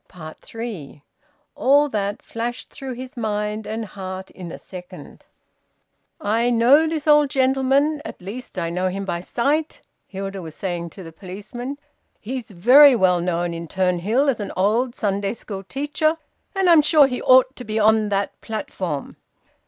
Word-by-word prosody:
THREE. 200 Hz, -12 st, -8 dB, 0.5 s
All 285 Hz, +3 st, +4 dB
that 205 Hz, -3 st, -3 dB
flashed 240 Hz, +2 st, -5 dB
through 270 Hz, -2 st, -7 dB
his 255 Hz, +3 st, -9 dB
mind 210 Hz, -2 st, -2 dB
and 220 Hz, +1 st, -3 dB
heart 190 Hz, -1 st, -7 dB
in 175 Hz, -3 st, -9 dB
a -, -, -7 dB
second. 180 Hz, 0 st, -11 dB, 0.9 s
"I 225 Hz, +4 st, +1 dB
know 250 Hz, +7 st, +5 dB
this 315 Hz, -2 st, -3 dB
old 295 Hz, -2 st, +5 dB
gentleman, 270 Hz, +3 st, +2 dB
at -, -, -8 dB
least 205 Hz, +5 st, -8 dB
I 170 Hz, -2 st, -2 dB
know 180 Hz, +2 st, 0 dB
him 195 Hz, +2 st, -4 dB
by 170 Hz, -2 st, -3 dB
sight," 290 Hz, -, -1 dB, 0.3 s
Hilda 195 Hz, 0 st, -6 dB
was 160 Hz, -3 st, -9 dB
saying 175 Hz, -3 st, -4 dB
to 190 Hz, +3 st, -11 dB
the 165 Hz, -, -10 dB
policeman. 210 Hz, -, -7 dB, 0.4 s
"He's 250 Hz, +2 st, -6 dB
very 250 Hz, +9 st, +7 dB
well 180 Hz, -5 st, +3 dB
known 175 Hz, -1 st, -1 dB
in 165 Hz, 0 st, -6 dB
Turnhill 190 Hz, -, +1 dB
as 265 Hz, -5 st, +1 dB
an 205 Hz, -, -4 dB
old 230 Hz, +6 st, +1 dB
Sunday 200 Hz, +1 st, -1 dB
school 200 Hz, -4 st, -7 dB
teacher, 295 Hz, -, -1 dB, 0.4 s
and 385 Hz, -1 st, +2 dB
I'm 335 Hz, -3 st, +7 dB
sure 300 Hz, -1 st, +5 dB
he 250 Hz, -2 st, -3 dB
ought 255 Hz, +1 st, +5 dB
to 250 Hz, -, -8 dB
be 215 Hz, -1 st, -3 dB
on 215 Hz, 0 st, +3 dB
that 200 Hz, 0 st, -2 dB
platform." 185 Hz, -9 st, -5 dB
220 Hz, 160 wpm, -22 LUFS, 190-260 Hz, 0.9 s, very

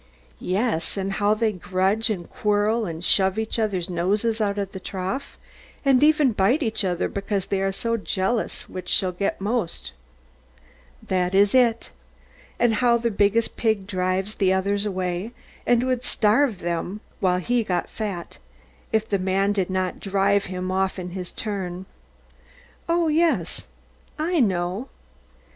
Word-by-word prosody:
Yes, 195 Hz, -2 st, -1 dB
and 195 Hz, 0 st, -1 dB
how 205 Hz, +1 st, +2 dB
they 220 Hz, 0 st, +1 dB
grudge 190 Hz, +4 st, 0 dB
and 180 Hz, -6 st, -3 dB
quarrel, 210 Hz, 0 st, +1 dB
and 165 Hz, +1 st, -5 dB
shove 190 Hz, 0 st, +3 dB
each 220 Hz, +1 st, -2 dB
other's 195 Hz, -6 st, 0 dB
noses 205 Hz, +6 st, 0 dB
out 205 Hz, -1 st, 0 dB
of 200 Hz, -1 st, -2 dB
the 190 Hz, -, -7 dB
trough, 190 Hz, +10 st, -4 dB, 0.5 s
and 270 Hz, -2 st, +5 dB
even 300 Hz, -3 st, +5 dB
bite 230 Hz, -, +2 dB
each 220 Hz, -3 st, 0 dB
other 180 Hz, -2 st, 0 dB
because 200 Hz, -1 st, -2 dB
they 195 Hz, -1 st, -1 dB
are 195 Hz, 0 st, +1 dB
so 230 Hz, +4 st, -1 dB
jealous 205 Hz, +2 st, -1 dB
which 185 Hz, -, -7 dB
shall 185 Hz, -1 st, +2 dB
get 195 Hz, +3 st, -2 dB
most. 205 Hz, -2 st, -2 dB, 1.1 s
That 185 Hz, 0 st, 0 dB
is 200 Hz, +1 st, +5 dB
it. 240 Hz, -3 st, +3 dB, 0.7 s
And 240 Hz, -2 st, +3 dB
how 235 Hz, +2 st, +3 dB
the 235 Hz, 0 st, -1 dB
biggest 205 Hz, +3 st, +1 dB
pig 220 Hz, -4 st, +1 dB
drives 185 Hz, +1 st, -1 dB
the 190 Hz, -3 st, +2 dB
others 200 Hz, +2 st, +1 dB
away, 185 Hz, +3 st, -3 dB, 0.3 s
and 240 Hz, 0 st, +4 dB
would 255 Hz, -1 st, 0 dB
starve 220 Hz, -1 st, +2 dB
them 175 Hz, +4 st, -3 dB, 0.2 s
while 180 Hz, -1 st, +2 dB
he 235 Hz, +6 st, +1 dB
got 180 Hz, -4 st, -1 dB
fat, 200 Hz, -6 st, -5 dB, 0.5 s
if 220 Hz, 0 st, +1 dB
the 200 Hz, -3 st, 0 dB
man 195 Hz, +2 st, +1 dB
did 195 Hz, -3 st, 0 dB
not 185 Hz, -1 st, -1 dB
drive 200 Hz, 0 st, +2 dB
him 185 Hz, 0 st, -4 dB
off 190 Hz, +1 st, 0 dB
in 180 Hz, -1 st, -5 dB
his 180 Hz, -1 st, -6 dB
turn. 190 Hz, -4 st, -4 dB, 1.0 s
Oh, 335 Hz, 0 st, +3 dB
yes; 305 Hz, -, +1 dB, 0.5 s
I 330 Hz, +2 st, 0 dB
know. 190 Hz, +1 st, 0 dB
200 Hz, 155 wpm, -24 LUFS, 185-225 Hz, 1.1 s, and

